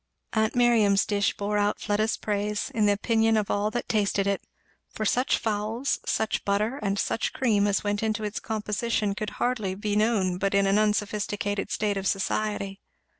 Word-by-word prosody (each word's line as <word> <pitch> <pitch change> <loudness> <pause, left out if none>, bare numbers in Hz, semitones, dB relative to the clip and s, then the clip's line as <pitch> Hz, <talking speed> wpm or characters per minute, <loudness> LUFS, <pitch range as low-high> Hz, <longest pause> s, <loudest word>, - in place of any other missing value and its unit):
Aunt 220 +1 +1
Miriam's 225 -5 +4
dish 200 -1 0
bore 205 +1 -1
out 205 0 +1
Fleda's 215 +1 0
praise, 210 0 -2
in 215 -2 +2
the - - +5
opinion 225 +2 +2
of 210 -2 0
all 205 +1 +1
that 240 +2 -4
tasted 200 -2 +1
it; 200 0 0 0.5
for 215 - -4
such 250 +5 +2
fowls, 220 +4 -1
such 220 - 0
butter, 210 +7 0
and 200 0 -1
such 225 - -1
cream, 210 -5 +2
as 200 -1 +1
went 205 0 0
to 220 0 -1
its 210 0 -3
composition 215 -1 -1
could 210 +1 -4
hardly 215 -7 -1
be 205 +1 -2
known 205 -5 +1
but 195 0 0
in 200 0 +4
an 195 +2 +3
unsophisticated 205 -1 -1
state 205 +1 -1
of 195 0 -2
society. 200 0 -1
210 Hz, 175 wpm, -26 LUFS, 200-220 Hz, 0.5 s, the